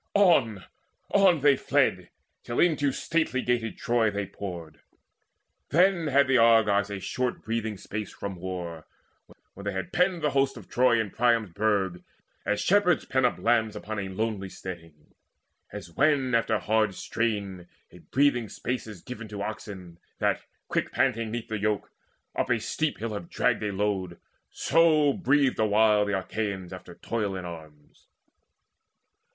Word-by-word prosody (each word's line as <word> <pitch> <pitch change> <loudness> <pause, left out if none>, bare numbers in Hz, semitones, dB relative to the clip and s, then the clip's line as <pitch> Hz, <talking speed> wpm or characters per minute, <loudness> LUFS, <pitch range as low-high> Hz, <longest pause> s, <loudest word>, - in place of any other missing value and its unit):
On, 135 - +3 0.5
on 190 -6 +4
they 140 -1 +5
fled - - +1 0.3
Till 120 - -4
into 150 -5 +3
stately 155 -2 -1
gated 120 -2 -1
Troy 120 -4 +2
they 100 -1 -3
poured. 90 -5 -8 0.9
Then 175 0 +3
had 140 0 +4
the 130 -2 +4
Argives 110 -3 +4
a 100 -1 -4
short 125 +6 -3
breathing 110 -2 -2
space 105 +3 -6
From 100 -1 -6
war, 85 -3 -6 0.7
when 100 - -11
they 100 - -2
had 95 - -5
penned 180 -2 +1
the 150 - +2
hosts 135 -1 +1
of 105 - -11
Troy 125 -2 +3
In 110 -3 -2
Priam's 115 -4 +2
burg, 95 -2 0 0.4
as 105 0 +1
shepherds 190 -4 +3
pen 130 -1 +1
up 125 - +1
lambs 110 -2 +1
Upon 110 0 -5
a 95 -1 -4
lonely 100 0 -3
steading. 85 -4 -9
And, 75 - -30 0.6
as 85 - -8
when 135 - +2
After 115 -1 +2
hard 110 -2 +1
strain, 100 -6 -3 0.2
a 90 - -14
breathing 125 +2 +1
space 125 -1 -4
is 105 -5 -10
given 115 -3 -8
To 105 -1 -5
oxen 100 -5 -7 0.2
that, - - 0 0.3
quick - - -1
panting 115 -4 +1
'neath 115 +1 -4
the 110 -1 -2
yoke, 105 -2 -1 0.4
Up - - -1
a 115 - +2
steep 155 +7 -2
hill 110 0 -4
have 100 -5 -6
dragged - - +1
a 105 -1 -1
load, 95 -3 -2 0.3
so 155 -4 +3
breathed 140 -7 +2
Awhile 105 -1 +4
the 100 -1 0
Achaeans 95 -2 -4
after 90 -1 -10
toil 105 -2 -3
in 90 -1 -5
arms. 80 -4 -12
110 Hz, 155 wpm, -27 LUFS, 95-130 Hz, 0.9 s, they